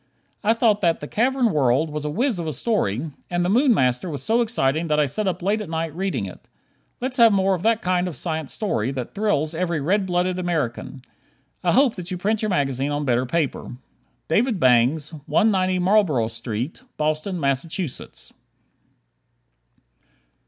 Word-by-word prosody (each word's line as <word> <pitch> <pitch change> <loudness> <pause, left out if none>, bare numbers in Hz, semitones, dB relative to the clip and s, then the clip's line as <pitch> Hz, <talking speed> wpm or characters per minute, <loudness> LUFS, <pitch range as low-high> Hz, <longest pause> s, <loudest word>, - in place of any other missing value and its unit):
I 220 +2 +3
thought 220 -3 +2
that 170 -3 +2
"The 150 - -7
Cavern 245 - +1
World" 145 +1 +2
was 150 0 -4
a - - -1
whiz 230 - 0
of 165 - -4
a 155 - -2
story, 150 - -1 0.2
and 175 0 0
"The - - 0
Moon 255 +5 +4
Master" 130 - +1
was 140 -4 -4
so 230 +7 +2
exciting 165 - 0
that 150 -1 +1
I 150 - +4
sat 195 +10 -2
up 180 -1 -2
late 210 +3 +1
at 210 - -7
night 160 -1 -3
reading 190 - -2
it. 95 - -11 0.5
Let's 255 +1 -2
have 230 -2 +7
more 195 -1 +2
of 180 - -2
that 225 +2 +1
kind 180 0 +1
of 175 - -5
science 160 0 -3
story, 130 - -1
that 130 -2 -5
thrills 195 -7 0
every 170 -1 -1
red 190 +7 +1
blooded 180 0 0
American. 145 -7 -3 0.6
I - - +2
hope 270 -4 +4
that 180 -1 -7
you 180 - -3
print 210 +4 0
your 215 - -1
magazine 140 -5 0
on 145 0 -2
better 125 0 +1
paper. 150 -4 -2 0.5
David 215 +5 +1
Bangs, 130 +4 +3
190 185 +2 +2
Marlboro 180 - +2
St., 115 - -5 0.2
Boston, 155 +4 -1
Mass. 140 +2 -3
170 Hz, 175 wpm, -23 LUFS, 145-205 Hz, 0.6 s, have